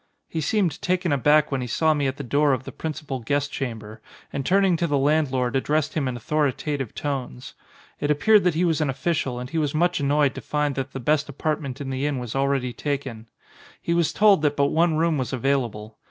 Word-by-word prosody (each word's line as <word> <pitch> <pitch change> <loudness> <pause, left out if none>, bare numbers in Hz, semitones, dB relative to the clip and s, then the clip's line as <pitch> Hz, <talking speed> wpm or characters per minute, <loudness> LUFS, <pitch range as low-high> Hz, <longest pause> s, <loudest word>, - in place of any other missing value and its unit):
He 160 - -3
seemed 190 +1 0
taken 180 -2 0
aback 150 +2 +3
when 135 -2 -1
he 125 - -4
saw 155 +6 +2
me 145 -2 0
at 135 +1 -3
the 145 - -5
door 145 +2 +2
of 130 -1 -2
the - - -8
principal 150 -4 -5
guest 145 +4 -1
chamber 110 -6 -6 0.3
and 140 - -2
turning 190 +3 +3
to 170 - 0
the 145 -2 +1
landlord 135 -3 +1
addressed 150 +3 0
him 145 -4 -1
in 125 -1 -3
authoritative 145 -1 -1
tones. 130 -3 -4 0.5
It 145 - -1
appeared 195 +9 +4
that 175 -3 +2
he 175 +3 +2
was 160 -3 +1
an 150 - +1
official 135 -2 -1
and 125 +1 -6
he 165 - 0
was 150 -1 -1
much 175 +2 +2
annoyed 145 0 +2
to - - -7
find 150 -1 -1
that 135 -1 -4
the 135 - -4
best 150 +4 +1
apartment 145 -2 -3
in 135 -2 -4
the 130 +2 -1
inn 145 -2 -1
was 125 -2 -5
already 135 -2 0
taken. 130 -6 -4 0.5
He 170 - -1
was 170 -3 +2
told 205 -2 +4
that 145 -1 +1
but 140 0 +3
one 165 0 +2
room 160 -1 +1
was 130 0 -3
available. 120 -5 -2
145 Hz, 220 wpm, -24 LUFS, 130-155 Hz, 0.5 s, appeared